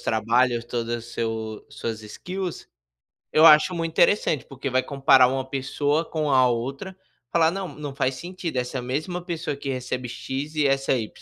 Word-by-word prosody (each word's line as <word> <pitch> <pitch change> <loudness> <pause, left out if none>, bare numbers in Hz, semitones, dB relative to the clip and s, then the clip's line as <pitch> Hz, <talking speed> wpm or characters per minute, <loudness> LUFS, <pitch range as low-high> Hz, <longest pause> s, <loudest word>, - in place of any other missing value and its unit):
trabalhos, 120 +2 +1
todo 120 -1 -3
o 120 0 -2
seu 110 -2 -4
suas 110 -1 -5
skills, 180 - -6 0.7
eu 155 +1 +6
acho 155 +3 +7
muito 165 -1 -2
interessante, 165 - +3
porque 135 0 -6
vai 130 0 +2
comparar 135 -2 +5
uma 130 +1 -2
pessoa 145 +3 0
com 155 -3 -2
a 130 -1 +5
outra, 135 +11 -4 0.3
falar: 165 -1 +4
"Não, 195 0 -4
não 145 -3 -7
faz 135 -2 0
sentido. 175 -2 -5
Essa 125 +1 -2
mesma 155 +8 -3
pessoa 165 -4 -3
que 140 0 -6
recebe 125 -1 -3
"x" 140 +5 -5
e 150 -2 +2
essa 135 0 +2
"y". 115 -4 -1
135 Hz, 170 wpm, -24 LUFS, 125-160 Hz, 0.7 s, acho